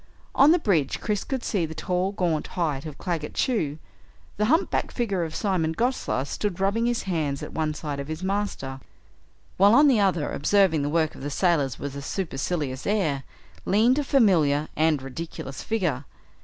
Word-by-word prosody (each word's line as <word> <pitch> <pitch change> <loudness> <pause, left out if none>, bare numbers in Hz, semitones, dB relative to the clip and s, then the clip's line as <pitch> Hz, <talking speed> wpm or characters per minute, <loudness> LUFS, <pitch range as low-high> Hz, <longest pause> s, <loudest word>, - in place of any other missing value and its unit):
On 280 +3 +6
the 345 - +5
bridge 180 - +1
Chris 210 -2 -1
could 265 -3 -3
see 195 -6 0
the 160 0 -4
tall 180 +4 -1
gaunt 170 -6 -1
height 155 -4 -1
of 150 - -8
Claggett 170 -5 -3
Chew. 160 - 0 0.6
The 210 - +2
humpbacked 320 - +1
figure 200 -8 -1
of 160 -1 -5
Simon 180 -6 0
Gosler 235 - 0
stood 190 +5 -3
rubbing 205 +5 +1
his 240 -1 0
hands, 155 -7 -2
at - - -7
one 155 -1 -1
side 145 -2 -4
of 140 - -5
his 155 +3 -5
master, 190 -9 -2 0.8
while 200 +4 +6
on 290 +2 +7
the 255 -6 +4
other, 180 -7 +1
observing 185 -1 +3
the 145 - -1
work 160 0 +1
of - - -12
the 145 - -3
sailors 145 -5 +1
with 140 0 -6
a 140 - -5
supercilious 145 -4 -3
air, 160 -10 0 0.4
leaned 235 +7 +3
a - - 0
familiar 165 - +3
and 155 -3 +2
ridiculous 135 -1 -7
figure. 175 - -1
170 Hz, 180 wpm, -25 LUFS, 145-205 Hz, 0.8 s, on